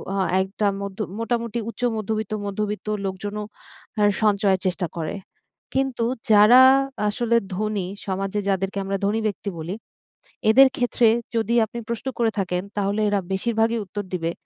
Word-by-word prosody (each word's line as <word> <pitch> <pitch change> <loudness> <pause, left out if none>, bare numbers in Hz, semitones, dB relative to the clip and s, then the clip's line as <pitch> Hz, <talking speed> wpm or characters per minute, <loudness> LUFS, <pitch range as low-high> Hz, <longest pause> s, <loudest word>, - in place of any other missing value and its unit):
আ - - -1 0.3
একটা 200 +2 -2
মধ্য 200 0 -6 0.2
মোটামুটি 235 0 -1
উচ্চ 230 - -10
মধ্যবিত্ত, 215 0 -3
মধ্যবিত্ত 210 +1 -3 0.2
লোকজনও 205 +2 -4 0.6
আর 205 - +5
সঞ্চয়ের 200 -2 +3
চেষ্টা 180 -1 -1
করে। 160 +4 -3 0.6
কিন্তু 265 -3 0 0.3
যারা 215 +5 +8 0.5
আসলে 235 +2 0 0.2
ধনী, 210 -2 -2 0.2
সমাজে 195 +1 -2
যাদেরকে 195 0 -1
আমরা 195 0 -1
ধনী 210 +3 +1
ব্যক্তি 200 0 -4
বলি, 170 +5 -4 0.7
এদের 265 +5 +8
ক্ষেত্রে 245 -1 +2 0.3
যদি 225 +1 +1
আপনি 235 +2 -7
প্রশ্ন 235 +3 -4
করে 230 -1 +2
থাকেন 180 -1 -1 0.2
তাহলে 205 +1 0
এরা 205 -1 +1
বেশিরভাগই 225 +3 +1
উত্তর 205 +2 -5
দিবে 165 -2 -1
210 Hz, 140 wpm, -23 LUFS, 195-225 Hz, 0.7 s, যারা